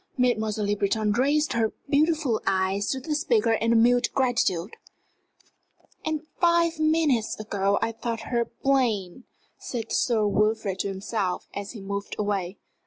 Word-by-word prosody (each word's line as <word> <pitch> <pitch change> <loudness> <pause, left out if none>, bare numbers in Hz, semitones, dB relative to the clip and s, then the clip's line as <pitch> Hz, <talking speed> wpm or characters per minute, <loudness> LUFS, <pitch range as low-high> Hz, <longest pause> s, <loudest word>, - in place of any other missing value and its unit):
Mademoiselle 220 -4 +1
Le 205 0 +1
Breton 210 +1 0
raised 285 +7 +2
her 225 -2 0
beautiful 295 -4 +2
eyes 190 +1 +1
to 265 - -1
the 300 +4 -3
speaker 340 - +2
in 230 +1 +1
a - - +4
mute 245 +2 +4
gratitude. 235 -8 0 1.3
"And 315 -1 -2 0.2
five 340 -1 +3
minutes 310 -9 +1
ago 200 -2 0
I 230 - 0
thought 230 0 -4
her 235 +1 0
plain!" 235 -6 -1 0.3
said 230 -3 -5
Sir 225 -4 +2
Wilfrid 210 -1 0
to - - -1
himself 195 -1 -3
as 200 +2 -6
he 215 - -9
moved 200 +1 -4
away. 200 -3 -2
225 Hz, 145 wpm, -26 LUFS, 200-265 Hz, 1.3 s, a